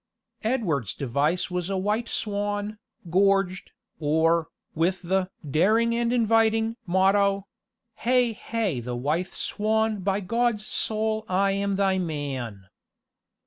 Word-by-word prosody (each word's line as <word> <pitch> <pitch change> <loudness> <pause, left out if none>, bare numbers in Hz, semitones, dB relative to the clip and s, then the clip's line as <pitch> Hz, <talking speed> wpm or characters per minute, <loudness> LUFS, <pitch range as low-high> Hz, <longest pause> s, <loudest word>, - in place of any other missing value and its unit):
Edward's 185 - 0
device 145 +8 0
was 180 0 -2
a 195 - -1
white 210 +5 -1
swan, 205 0 -2 0.3
gorged, 195 0 +2 0.3
or, 160 +2 +2 0.3
with 175 +3 0
the 185 +1 0 0.2
"daring 215 +11 +3
and 235 0 +1
inviting" 225 -1 +3
motto 195 +2 +3 0.5
Hay 245 -1 +2
hay 215 - -2
the 120 +1 -4
wythe 150 +9 -1
swan 220 0 0
By 195 +1 0
God's 230 +1 0
soul 220 0 -1
I 195 +2 +2
am 200 0 0
thy 190 -1 +2
man. 135 - -4
195 Hz, 115 wpm, -26 LUFS, 170-220 Hz, 0.5 s, daring